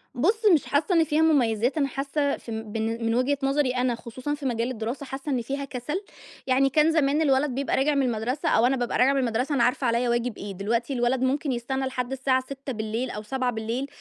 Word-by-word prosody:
بُص 420 - +1
مش 310 - +3
حاسَّة 305 +6 +1
إن 330 - +5
فيها 305 0 +1
مميِّزات، 250 -5 +2
أنا 280 -2 +2
حاسَّة 280 +2 -1
في 230 - -10
بن 225 +1 -3
من 225 0 +1
وجهة 260 +3 +1
نظري 275 -1 +2
أنا، 250 -1 0
خُصوصًا 250 +5 -5
في 290 -1 -6
مجال 240 0 -1
الدراسة، 240 +5 -4
حاسَّة 270 +2 -5
إن 255 -3 0
فيها 275 +4 -4
كسل، 275 +7 -4 0.5
يعني 270 +1 +3
كان 305 +3 +3
زمان 300 -1 +2
الولد 280 -1 +3
بيبقى 275 0 0
راجع 285 +2 +2
من 275 - +2
المدرسة، 245 +4 -1
أو 225 - +4
أنا 260 +2 +3
بابقى 245 -1 -1
راجعة 265 +2 +4
من 275 - +1
المدرسة، 250 +4 0
أنا 240 - +3
عارفة 250 +2 +1
عليَّ 235 +1 +1
واجب 240 -1 -1
إيه. 205 - -6
دلوقتي 230 +7 -1
الولد 245 +1 +1
ممكن 275 +2 0
يستنَّى 265 +2 -2
لحد 260 -1 -3
الساعة 260 0 +1
18:00 255 -3 -4
أو 210 - -5
19:00، 245 +1 -2
260 Hz, 215 wpm, -25 LUFS, 235-280 Hz, 0.5 s, إن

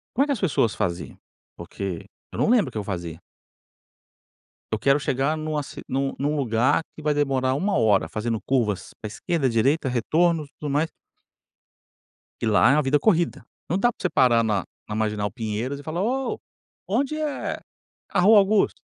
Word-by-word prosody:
Como 270 - +4
é - - -5
que 290 - 0
as 250 - -3
pessoas 140 - +1
faziam? 85 -3 -3 0.4
Porque 95 -4 -5 0.3
eu - - -7
não - - +2
lembro 235 -4 +4
o - - -11
que - - -4
eu 105 - -2
fazia. 85 -4 -5 1.5
Eu - - +1
quero 140 +1 +3
chegar 140 +3 0
numa 155 -1 -2
ci - - -9
num 135 +1 -1
num 145 +2 -1
lugar 130 +2 +2
que 155 - -11
vai 150 0 +2
demorar 135 -3 +1
1 195 +9 0
hora 100 -8 +3
fazendo 110 +3 -2
curvas 110 -8 -1
pra 105 - -5
esquerda, 135 +6 -1
direita, 135 +6 +2
retornos 155 +6 +1
e - - -37
tudo 150 - -3
mais. 150 +3 +1 1.5
E - - 0
lá 110 +3 +5
é 140 - +4
uma 150 - +3
vida 140 +1 +2
corrida. 170 +1 +1 0.2
Não 180 - 0
dá 240 +4 +3
pra - - -35
você 180 - +1
parar 120 -7 +4
na 105 -4 0 0.2
na 105 - -3
Marginal 105 -1 -1
Pinheiros 115 +4 -3
e - - -10
falar: 165 +4 -2
"Ô, 260 +5 -1 0.5
onde 265 +9 0
é 305 -2 -3 0.5
a - - 0
Rua 210 +4 +7
Augusta?". 200 +1 +2
140 Hz, 185 wpm, -24 LUFS, 110-170 Hz, 1.5 s, Rua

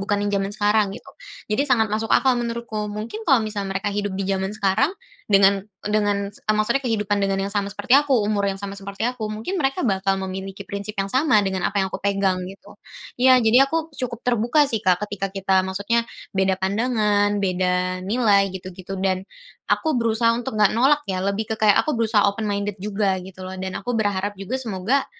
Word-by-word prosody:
bukan 205 +1 -1
yang 205 - -1
zaman 195 - -2
sekarang 210 0 +2
gitu. - - -13 0.5
Jadi 280 +7 +1
sangat 220 -5 +2
masuk 220 +1 -1
akal 265 - +4
menurutku. 230 -3 -4
Mungkin 220 - -6
kalau 255 -5 +5
misal 205 -2 -4
mereka 195 +2 -2
hidup 205 -1 -2
di 195 - -2
zaman 195 +2 -2
sekarang 210 +7 +2 0.4
dengan 195 0 +5 0.2
dengan, 205 -1 0
eee, 215 +1 -2
maksudnya 215 +6 +1
kehidupan 210 -5 0
dengan 195 -1 +1
yang 200 - -4
sama 200 -1 -1
seperti 200 +4 -3
aku, 280 -1 +5
umur 205 -1 0
yang 195 - -2
sama 200 0 -6
seperti 200 +1 -6
aku, 240 -3 -2
mungkin 225 - -3
mereka 270 -2 0
bakal 195 -2 +1
memiliki 190 +1 -6
prinsip 200 +2 -6
yang 195 0 -2
sama 260 -6 +3
dengan 190 -2 -1
apa 205 - -7
yang 190 - -6
aku - - -4
pegang 195 -2 +1
gitu. 195 +1 -13 0.5
Iya, 255 0 +7
jadi 250 +5 +5
aku 320 +1 -2
cukup 240 -2 -4
terbuka 245 +5 +3
sih 235 -6 -1
Kak, 185 -1 +2
ketika 205 -1 -4
kita 190 -1 +1
maksudnya 200 +5 -1 0.2
beda 190 -1 +1
pandangan, 205 0 +1
beda 185 -1 0
nilai 200 0 +2
gitu-gitu 185 +1 -8
dan 190 0 -1 0.4
aku 315 - +1
berusaha 230 0 +2
untuk 240 -1 -4
nggak 210 -2 +4
nolak 280 +6 +3
ya, 185 -5 -3
lebih 200 +3 -2
ke 220 - -5
kayak, 210 -2 +5
aku 305 - -1
berusaha 220 -2 +2
open 210 +2 -3
minded 205 -1 -3
juga 195 -1 -1
gitu 185 0 -10
loh 185 0 -7
dan 190 0 -4
aku 245 +5 -3
berharap 205 -1 -1
juga 225 +7 -3
semoga, 230 +4 0
205 Hz, 200 wpm, -22 LUFS, 195-230 Hz, 0.5 s, Iya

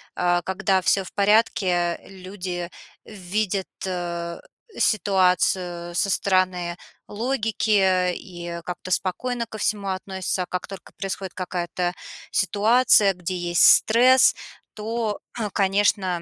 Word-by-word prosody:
а, 175 0 +1
когда 190 +1 0
всё 195 +1 +2
в 185 - -11
порядке, 200 -4 +2
люди 185 -2 -6 0.3
видят, 200 0 -3 0.2
э, 170 -2 -4 0.4
ситуацию 180 -3 +1
со 200 - +1
стороны 185 -3 0 0.3
логики 210 -6 +1
и 175 -1 -8
как-то 180 +1 -7
спокойно 235 +7 -1
ко 215 - -8
всему 205 -1 -1
относятся, 190 0 -2
а - - -7
как 180 0 -5
только 195 -1 -11
происходит 195 -1 -5
какая-то 180 -1 -3 0.4
ситуация, 210 0 +4
где 180 0 -5
есть 175 -1 +2
стресс, 250 +4 +6 0.4
то, 220 0 -3 0.3
конечно, 195 -2 +1
190 Hz, 105 wpm, -23 LUFS, 180-205 Hz, 0.4 s, стресс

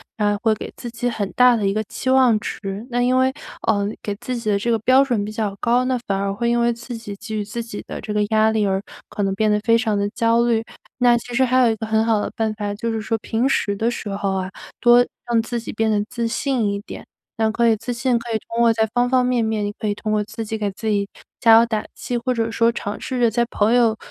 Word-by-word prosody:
然 210 -1 +1
后 205 - -2
会 220 -1 +4
给 - - -7
自 240 - -7
己 245 +1 -2
很 205 -4 -3
大 250 -1 +6
的 215 -3 -1
一 195 - +1
个 215 - -1
期 260 - -4
望 255 -5 +5
值。 - - -5 0.3
那 245 +1 +1
因 250 +1 +2
为， 260 0 +2 0.3
呃， 205 -2 +2 0.2
给 205 - -3
自 250 +4 -4
己 225 -2 -3
的 200 - +1
这 235 - -2
个 230 - +3
标 255 +5 +5
准 240 -7 -1
比 210 - -6
较 215 -2 -2
高， 245 +1 +2
那 255 -1 +1
反 195 - -1
而 200 0 -1
会 235 +3 -2
因 240 0 +2
为 235 0 +3
自 235 +1 -7
己 215 -3 -7
给 215 +2 -7
予 210 - -1
自 220 +3 -5
己 225 -3 -7
的 - - -6
这 215 - -5
个 210 0 +2
压 220 0 +3
力， 220 -1 +1
而 190 0 0 0.3
可 205 - -3
能 195 - 0
变 215 +2 +1
得 210 0 +2
非 230 +1 +4
常 220 -3 0
地 200 - 0
焦 230 +2 +2
虑。 230 -2 +1 0.4
那 245 -1 +5
其 245 +1 -8
实 260 +2 +3
还 255 0 +2
有 230 - +4
一 - - -1
个 220 0 -5
很 220 0 +2
好 225 -2 +2
的 - - -3
办 220 -1 -1
法， 205 -1 -4
就 230 +2 -3
是 220 -1 -2
说 225 +1 -1
平 235 +5 0
时 205 -6 0
的 225 +4 0
时 220 -3 -5
候 195 -1 -2
啊， 185 0 -2 0.3
多 240 0 +6 0.2
让 235 -1 +2
自 235 +1 -3
己 230 - -7
变 220 +1 0
得 210 -1 +1
自 235 -1 -2
信 235 -1 0
一 200 - -3
点。 - - -10 0.3
那 220 -1 +2
可 235 +1 +2
以 225 - +4
自 245 +4 -4
信， 240 0 +1
可 235 +1 -9
以 - - +3
通 230 - -3
过 230 -1 +5
在 220 0 +2
方 245 0 +2
方 255 -1 +3
面 245 -2 +1
面， 220 -1 -1
你 205 - -2
可 215 - -2
以 205 - 0
通 215 +1 -4
过 215 - +2
自 225 - -6
己 220 0 -4
给 210 -2 -1
自 220 +3 -7
己 200 -1 +1 0.3
加 225 -1 +6
油 230 - +6
打 220 -2 -2
气。 245 - -3
或 250 +2 -1
者 225 -1 -1
说 230 +1 +3
尝 210 -3 -4
试 260 - -4
着 235 -2 +4
在 235 +2 +1
朋 220 0 +1
友， 230 -3 +3
225 Hz, 310 characters per minute, -21 LUFS, 210-240 Hz, 0.4 s, 大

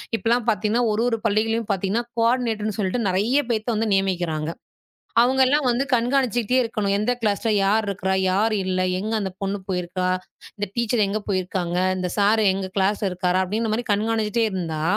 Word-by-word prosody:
இப்பல்லாம் 230 +1 +1
பார்த்தீங்கன்னா 220 +3 +1
1, 210 +1 0
1 230 - 0
பள்ளிகளிலும் 225 +1 +1
பாத்தீங்கன்னா 195 +4 0
கோர்டினேட்டர்ன்னு 230 -3 0
சொல்லிட்டு 210 +3 -1
நிறைய 225 +10 +2
பேர்த்தை 225 +1 0
வந்து 220 +1 0
நியமிக்கிறாங்க. 175 -5 0 0.7
அவங்க 260 +2 +2
எல்லாம் 290 +1 +2
வந்து 250 +3 +1
கண்காணச்சிட்டே 245 -1 +1
இருக்கணும். 210 -3 -1
எந்த 215 +4 +1
க்லாஸ்ல 215 +1 0
யார் 210 +2 +2
இருக்கரா? 190 -1 -1 0.2
யார் 215 +3 +2
இல்லை? 185 0 0 0.2
எங்க 215 +3 -3
அந்தப் 190 -2 -5
பொண்ணு 195 +1 -1
போயிருக்கா? 180 0 -2 0.5
இந்த 205 0 -2
டீச்சர் 235 -2 +2
எங்க 215 +2 -2
போயிருக்காங்க, 180 -2 -1 0.2
இந்த 180 -1 -2
சார் 210 +2 +3
எங்க 190 0 -3
க்ளாஸ்ல 200 +1 +1
இருக்காரா? 180 0 0
அப்படிங்கற 215 +3 -2
மாரி 240 +1 -2
கண்காணச்சிட்டே 220 +1 0
இருந்தா, 165 -4 -3
210 Hz, 160 wpm, -23 LUFS, 190-230 Hz, 0.7 s, சார்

